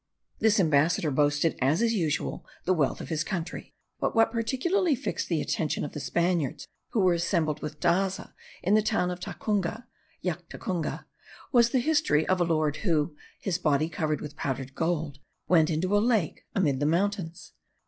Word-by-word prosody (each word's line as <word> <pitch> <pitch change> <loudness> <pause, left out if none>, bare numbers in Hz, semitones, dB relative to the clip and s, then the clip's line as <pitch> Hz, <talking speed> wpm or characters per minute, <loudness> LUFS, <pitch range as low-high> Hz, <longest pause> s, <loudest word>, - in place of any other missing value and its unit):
This 220 0 +4
ambassador 155 -1 +3
boasted, 145 +3 +2
as 140 +7 +3
is 230 0 +2
usual, 165 -8 -1 0.2
the 185 - +3
wealth 150 -6 0
of - - -8
his 160 -1 0
country; 175 -3 -5 0.3
but - - -1
what 225 0 +4
particularly 275 - +1
fixed - - -3
the 165 -3 +1
attention 155 -2 -1
of 145 - -6
the - - -6
Spaniards 170 -1 -1 0.2
who 220 - +1
were 185 -2 +4
assembled 165 -3 0
with 150 0 -6
Daza 190 +4 0 0.3
in 190 - +2
the 215 - +6
town 205 -5 0
of 180 - -5
Tacunga 210 +4 -2 0.4
(Llactacunga), 175 0 -3 0.5
was 235 -3 +5
the 260 - +1
history 255 - +2
of 185 -1 +2
a - - +4
lord 155 -3 +1
who, 160 -5 0 0.2
his 180 -3 -1
body 155 -1 +2
covered 155 -2 -1
with 150 -1 -7
powdered 135 -2 -3
gold, 160 -2 -2 0.3
went 165 -3 +4
into 180 +5 0
a - - +5
lake 215 -7 0
amid 145 -9 +2
the 145 - +1
mountains. 180 0 -1
170 Hz, 170 wpm, -28 LUFS, 155-205 Hz, 0.5 s, the